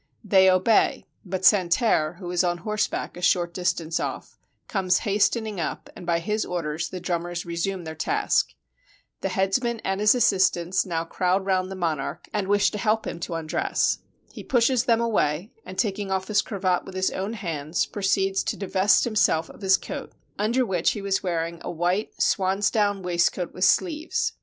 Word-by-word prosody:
They 190 -2 +5
obey; 185 +4 +3 0.2
but 185 -1 -3
San 185 -4 +5
terre, 170 -6 +2
who 175 0 -7
is 180 +1 +2
on 175 -1 0
horseback 215 0 -2
a 175 - -9
short 175 -1 +2
distance 175 -3 -1
off, - - -5 0.3
comes 185 -3 +1
hastening 210 0 +1
up, 165 - -4
and 175 - -10
by 170 -1 +2
his 210 +6 -1
orders 160 -2 -3
the 185 - -6
drummers 175 0 -3
resume 175 +2 -3
their 160 -1 -6
task. 415 - 0 0.6
The - - -2
headsman 230 +5 0
and 195 +1 -2
his 210 +3 +5
assistants 190 -6 +2
now 165 -2 -1
crowd 185 +3 0
round 185 -1 +1
the 190 - -6
monarch, 165 -2 -3
and 205 -2 -1
wish 205 0 +3
to 210 - -5
help 220 0 +1
him 170 - -5
to 170 - -4
undress. 160 -1 0 0.3
He - - -8
pushes 250 0 +2
them 230 -2 +3
away, 205 -5 0 0.2
and, 185 0 -8
taking 205 -3 -1
off 190 +1 -2
his 210 -1 +3
cravat 185 -4 -1
with 190 - -10
his 185 0 +1
own 195 +4 -3
hands, 165 -6 -2
proceeds 195 -1 0
to - - -2
divest 195 0 +3
himself 210 -8 +1
of - - -16
his 190 -1 +4
coat, - - -7 0.3
under 235 +5 +2
which 180 -5 +1
he 205 - -6
was 195 -1 0
wearing 170 -2 -2
a - - -6
white 175 +5 -1
swan's 195 +1 +2
down 205 -3 +1
waist 175 -1 +2
coat 180 -2 -5
with 185 - +1
sleeves. 375 - +1
190 Hz, 185 wpm, -25 LUFS, 175-210 Hz, 0.6 s, They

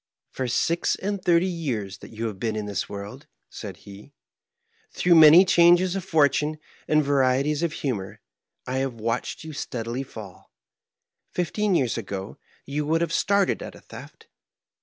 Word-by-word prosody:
"For 130 - -3
six 165 +7 +1
and 200 -1 -4
thirty 170 +1 +3
years 120 - -3
that - - -12
yon 115 +1 -5
have 100 -4 -7
been 110 0 -2
in 105 -1 -3
this 100 -1 -3
world," 105 +9 -8 0.2
said 100 -5 -8
he, 100 0 -13 0.8
"throngh 175 -2 +5
many 160 +4 +9
changes 175 +1 +4
of 195 - -3
fortnne 155 -3 +2 0.3
and 155 0 +3
varieties 140 +2 +1
of 170 -2 0
hnmor, 115 -11 -4 0.5
I 130 +1 -3
have 135 -2 -2
watched 115 +6 -3
you 160 -1 -8
steadily 120 -3 -4
fall. 110 -8 -11 0.8
Fifteen 195 +3 0
years 125 -7 0
ago 100 -2 -7 0.3
you 145 +2 -2
would 165 +2 +1
have 170 -1 -1
started 200 +2 +1
at - - -8
a - - -15
theft. - - -13
140 Hz, 160 wpm, -24 LUFS, 115-170 Hz, 0.8 s, many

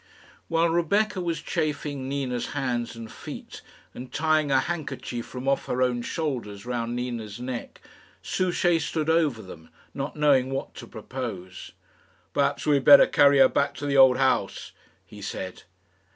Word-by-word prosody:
While 165 +1 +2
Rebecca 190 +4 +1
was 170 -2 -2
chafing 145 -4 -2
Nina's 130 -4 -3
hands 120 -4 -2
and 115 -1 -9
feet, - - -9 0.3
and 125 +1 -9
tying 155 -1 +1
a 135 -1 +4
handkerchief 135 -7 -5
from 130 +1 -7
off 140 0 +1
her 130 +1 +1
own 125 -1 0
shoulders 120 -9 -4
round 120 -1 -3
Nina's 120 -4 -5
neck, 125 -1 -6 0.4
Souchey 175 -2 +1
stood 155 +1 -1
over 150 -9 +1
them, 80 -4 -12 0.2
not 140 +1 -4
knowing 140 -4 +3
what 135 0 -4
to 120 - -10
propose. 110 -6 -7 0.6
"Perhaps 140 0 0
we 150 -2 +4
had 135 - -2
better 140 -1 +10
carry 140 0 +5
her 135 -1 +8
back 140 +1 0
to 145 - -6
the 140 -1 0
old 130 -2 +7
house," 135 -1 0 0.3
he 105 +3 -13
said. 95 -1 -6
135 Hz, 155 wpm, -26 LUFS, 120-150 Hz, 0.6 s, better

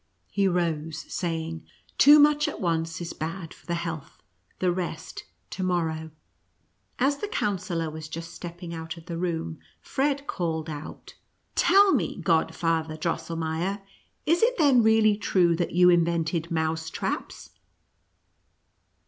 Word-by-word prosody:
He 200 -1 +2
rose, 165 -4 -1
saying, 165 -2 -3 0.2
" - - -33
Too 290 +2 +9
much 295 0 +5
at - - -5
once 165 -3 -1
is 170 - -5
bad 165 +1 -5
for - - -21
the 170 - 0
health 165 -4 -6 0.2
— 90 - -40
the 180 -1 +1
rest 175 -3 -5 0.3
to 190 - -5
morrow." 165 -3 -1 0.9
As 275 +3 +2
the 415 - -4
Coun 205 - -1
sellor 165 -3 -3
was 155 0 -8
just 165 +1 -7
stepping 175 0 -8
out 160 0 -6
of 165 - -12
the 170 -2 -5
room, 165 -2 -2 0.2
Fred 280 0 -1
called 160 - -2
out, 150 0 -8 0.2
" - - -46
Tell 390 +3 +6
me, - - 0
Godfather 160 -1 0
Drosselmeier, 165 +4 -2 0.4
is 335 +3 +3
it - - +3
then 275 -6 +5
really 220 -1 +4
true 180 -4 +3
that 175 - -1
you 180 +1 +6
invented 170 -1 +1
mouse 160 -1 -1
traps - - -4
170 Hz, 150 wpm, -26 LUFS, 160-195 Hz, 0.9 s, Too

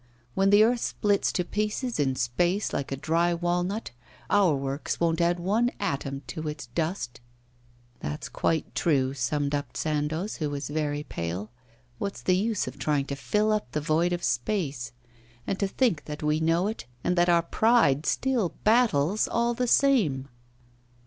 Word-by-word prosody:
When 195 +6 +3
the 205 +1 +7
earth 240 +2 +3
splits 205 -3 +1
to 180 - 0
pieces 215 - -2
in 135 -2 +1
space 175 - 0
like 140 - -3
a - - 0
dry 165 +4 +1
walnut, 175 +5 -1 0.4
our 195 -7 +4
works 135 +1 -3
won't 165 -1 +1
add 175 +1 +2
one 215 +7 +2
atom 140 -7 -3
to 155 +5 -5
its 150 -3 -5
dust.' 160 -6 -2 0.8
'That's 75 +1 -4
quite 160 -2 -1
true,' 135 -5 +1
summed 140 +3 -1
up 145 0 -3
Sandoz, 155 +6 -1
who 155 -4 -2
was 145 0 -4
very 150 -1 -1
pale. 90 - -5 0.5
'What's 200 -1 -4
the 185 - +3
use 210 +2 0
of - - -7
trying 145 -3 +1
to 140 - -4
fill 210 +9 +1
up 210 - -1
the 150 - 0
void 155 +4 +1
of 175 0 -2
space? 145 - -1 0.5
And 195 - -2
to 200 - +1
think 195 - 0
that 150 0 -6
we 150 +1 +2
know 165 +3 +2
it, 215 - -4 0.2
and 180 - +1
that 175 0 +3
our 170 -1 +4
pride 170 - +3
still 250 -9 0
battles 215 - +3
all 235 +1 +1
the 250 +1 -1
same! 200 - +3
170 Hz, 170 wpm, -27 LUFS, 145-205 Hz, 0.8 s, the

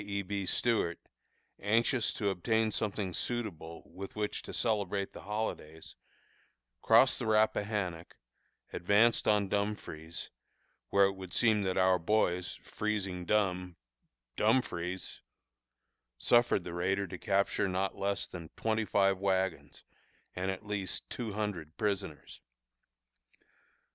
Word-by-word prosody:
E. 100 0 -2
B. 100 0 -3
Stuart, 110 -8 +1 0.6
anxious 115 +4 +2
to 100 -2 0
obtain 110 +4 +1
something 100 -3 -2
suitable 90 -10 -4
with 95 +3 -9
which 105 -1 -2
to - - -9
celebrate 100 -3 -1
the - - -9
holidays, 95 -7 -5 0.9
crossed - - +5
the - - -2
Rappahannock, 105 -5 0 0.6
advanced 105 +6 +3
on 105 -2 +3
Dumfries, 95 -6 -3 0.6
where 100 0 +5
it 95 - +2
would 95 -2 -9
seem 110 -3 +3
that 95 -2 -1
our 95 -1 +4
boys, 90 -1 +1
freezing 100 -4 -3
dumb 90 -3 +1 0.6
(Dumfries), 95 -6 0 1.0
suffered 120 - +3
the 90 - -6
raider 95 +3 0
to 90 -1 -8
capture 100 0 +1
not 95 +1 -1
less 100 0 -1
than 85 -3 -9
twenty 110 0 0
five 95 -1 +2
wagons, 95 -2 -1 0.5
and 95 +1 -2
at 95 +2 -4
least 105 -2 -3
two 115 -4 -3
hundred 95 -7 -4
prisoners. 100 -8 -3
100 Hz, 120 wpm, -32 LUFS, 90-105 Hz, 1.0 s, crossed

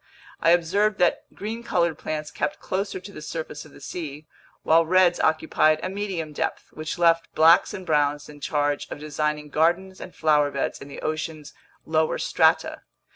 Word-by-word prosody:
I 165 - +3
observed 190 +5 +3
that 175 -1 +1
green 220 +3 -5
colored 170 -8 0
plants 155 -1 -4
kept 195 - -2
closer 195 0 -3
to 190 +2 -11
the 170 - -10
surface 155 -1 -6
of 155 - -15
the - - -15
sea, 150 +1 -7 0.4
while 165 +1 +5
reds 180 +1 +3
occupied 155 0 +2
a 185 - -2
medium 190 -6 -4
depth, - - -3
which 155 +2 -5
left 165 -1 +3
blacks 160 +2 +6
and 190 - -7
browns 145 -2 +1
in 150 -1 -13
charge 145 0 -1
of - - -6
designing 150 0 -2
gardens 175 +5 +1
and 185 - -9
flowerbeds 150 -3 +1
in 140 - -9
the 140 - -9
ocean's 155 -1 -4 0.3
lower 160 0 +1
strata. - - +2
160 Hz, 170 wpm, -24 LUFS, 150-180 Hz, 0.4 s, blacks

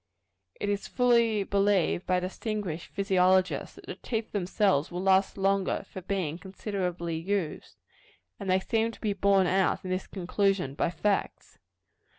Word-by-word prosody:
It - - -2
is 205 -1 -1
fully 235 -4 +3
believed 195 -3 +1
by 180 0 +2
distinguished 185 -2 -4
physiologists, 185 -1 +2
that - - -14
the - - -5
teeth 225 -2 -4
themselves 190 -5 +1
will 180 +1 -4
last 190 +1 +3
longer 195 0 +1
for 190 - -8
being 180 -4 -2
considerably 185 -4 -3
used; 185 -2 -3 0.6
and 195 - -5
they 185 +1 +4
seem 225 +3 0
to - - -14
be 210 -3 -1
borne 195 -1 +3
out 190 +1 +1
in 185 - -3
this 185 +1 -2
conclusion 190 -4 0
by 145 - 0
facts. 200 +4 -2
195 Hz, 150 wpm, -28 LUFS, 180-205 Hz, 0.6 s, they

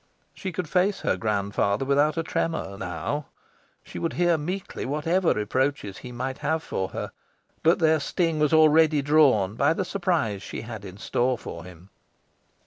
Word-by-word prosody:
She 190 - -5
could 180 -1 -4
face 185 +5 +1
her - - +1
grandfather 100 +2 0
without 145 +3 +2
a 165 - 0
tremour 160 -11 -2
now. 95 - -4 0.6
She - - -8
would 165 - -2
hear 175 -1 +3
meekly 180 +5 -4
whatever 165 +6 +1
reproaches 105 -1 -1
he 125 - -9
might 130 +2 -4
have 160 0 -1
for 95 - -3
her, - - -5 0.5
but 165 +2 +4
their 160 -1 +3
sting 165 +2 0
was 150 -1 +2
already 155 -1 +5
drawn 135 -10 +4
by 115 - +2
the 185 +2 -2
surprise 170 - -1
she - - -6
had 110 -3 -8
in 95 0 -9
store 125 +4 0
for 85 -5 -8
him. 90 +1 -14
145 Hz, 165 wpm, -25 LUFS, 105-165 Hz, 0.6 s, already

